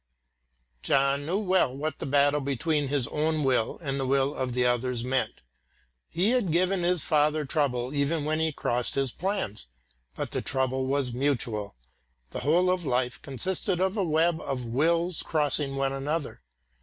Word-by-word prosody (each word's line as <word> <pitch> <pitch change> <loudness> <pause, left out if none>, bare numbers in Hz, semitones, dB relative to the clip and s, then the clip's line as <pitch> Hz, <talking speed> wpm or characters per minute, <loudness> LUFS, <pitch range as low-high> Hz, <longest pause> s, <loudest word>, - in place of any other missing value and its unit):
John 140 - +1
knew 180 +4 0
well 185 -10 +1
what 155 +1 -3
the - - -4
battle 145 +1 +3
between 140 +2 -1
his 135 -3 +1
own 155 0 0
will 130 -4 +1
and 140 -2 -2
the 135 - -1
will 135 +1 +2
of 125 -3 -3
others 125 -1 +1
meant. 130 +1 -1 0.7
He 185 +7 +1
had 245 -9 +1
given 180 +3 +2
his 175 -3 +3
father 150 0 +2
trouble 130 -3 0
enough 145 +2 0
when 155 +1 -1
he 160 0 +1
crossed 125 -4 0
his 135 -2 +1
plans; 180 - -3 0.5
but - - -4
the - - -2
trouble 130 0 0
was 135 -2 0
mutual; 120 - -1 0.6
the - - -4
whole 175 +6 +3
of 185 -1 -1
life 125 -2 -1
consisted 180 - 0
of 190 +2 0
a 205 - 0
web 160 0 +1
of 125 -2 -4
wills 165 +8 +1
crossing 145 -2 +1
one 135 0 0
another. 145 - -3
145 Hz, 165 wpm, -27 LUFS, 130-165 Hz, 0.7 s, battle